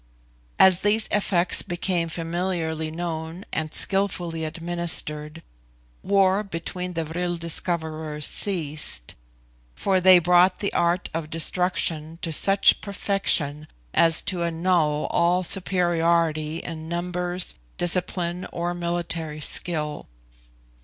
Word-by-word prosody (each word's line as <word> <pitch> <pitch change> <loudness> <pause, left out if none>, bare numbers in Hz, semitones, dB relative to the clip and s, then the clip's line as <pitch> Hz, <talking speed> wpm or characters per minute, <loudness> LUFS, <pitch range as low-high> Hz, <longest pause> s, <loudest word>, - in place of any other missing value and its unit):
As 190 -1 +6
these 215 +2 +3
effects 185 -4 +2
became 175 -2 -1
familiarly 165 -1 -2
known 165 +2 -5
and 155 -1 -2
skillfully 175 -5 -1
administered, 165 -2 -2 0.6
war 195 0 +3
between 180 -1 -5
the 165 -1 -2
vril 175 +2 -3
discoverers 160 -2 -2
ceased, 155 - -1 0.6
for 190 -2 +1
they 185 0 +8
brought 180 +2 +4
the 200 - -2
art 175 +1 0
of 160 -1 -4
destruction 165 -1 0
to 165 - -2
such 195 +5 +4
perfection 185 -7 0 0.3
as 165 -2 +3
to 180 -3 -1
annul 165 -3 +1
all 175 +2 +2
superiority 170 -4 +1
in 160 -1 -7
numbers, 180 +1 -2 0.2
discipline, 175 0 0
or 175 +1 -2
military 170 -3 -3
skill. 150 -1 -2
170 Hz, 105 wpm, -24 LUFS, 160-180 Hz, 0.6 s, they